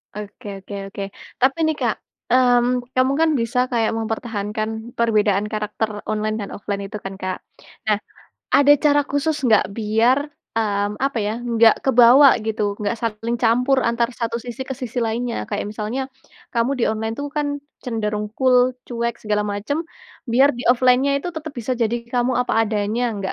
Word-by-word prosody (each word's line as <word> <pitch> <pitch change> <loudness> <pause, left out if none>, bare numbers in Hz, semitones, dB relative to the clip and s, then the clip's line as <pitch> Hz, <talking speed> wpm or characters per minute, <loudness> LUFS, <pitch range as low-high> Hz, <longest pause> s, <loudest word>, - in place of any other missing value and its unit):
Oke 210 0 -8
oke 200 - -8 0.2
oke. 200 - -4 0.4
Tapi 265 +4 +3
nih 315 0 +1
Kak, - - +1 0.3
mmm, 245 0 +3
kamu 255 +1 +2
kan 325 - +4
bisa 235 +2 0
kayak 225 -2 +1
mempertahankan 220 0 -3
perbedaan 210 -3 +2
karakter 215 0 -2 0.2
online 215 0 -1
dan 200 -2 -5
offline 200 -1 -4
itu 210 +1 -6
kan 195 - -4
Kak. 185 -1 -3 0.5
Nah, 210 - +4 0.6
ada 285 +1 +7
cara 290 0 +5
khusus 295 +2 0
enggak 220 -3 +5
biar, 225 +4 +2 0.3
mmm, 205 -2 -1
apa 275 -3 0
ya 210 - -1
enggak 230 -2 +4
kebawa 260 +2 +7 0.2
gitu, 210 -2 -1
enggak 210 +3 -2
saling 230 +1 -2
campur 250 +3 +3
antar 235 0 +1
satu 230 0 -3
sisi 245 +2 -5
ke 265 - -3
sisi 250 -2 -5
lainnya, 235 +1 -2
kayak 205 - -2
misalnya, 215 +5 -3 0.5
kamu 235 +2 +1
di 245 - +1
online 220 +1 -2
itu 285 - -4
kan 295 -1 +1 0.4
cenderung 210 -3 -2
cool, 255 -1 +3
cuek, 235 -1 -2
segala 210 -1 0
macam, 210 +9 -2 0.5
biar 270 +4 +6
di - - -4
offline-nya 255 +2 +4
itu - - -1
tetap 315 -1 -5
bisa 240 +2 -2
jadi 235 -1 0 0.2
kamu 245 +1 +1
apa 250 - -1 0.2
adanya 210 +2 -1
nggak 195 -1 -3
230 Hz, 165 wpm, -21 LUFS, 215-250 Hz, 0.6 s, ada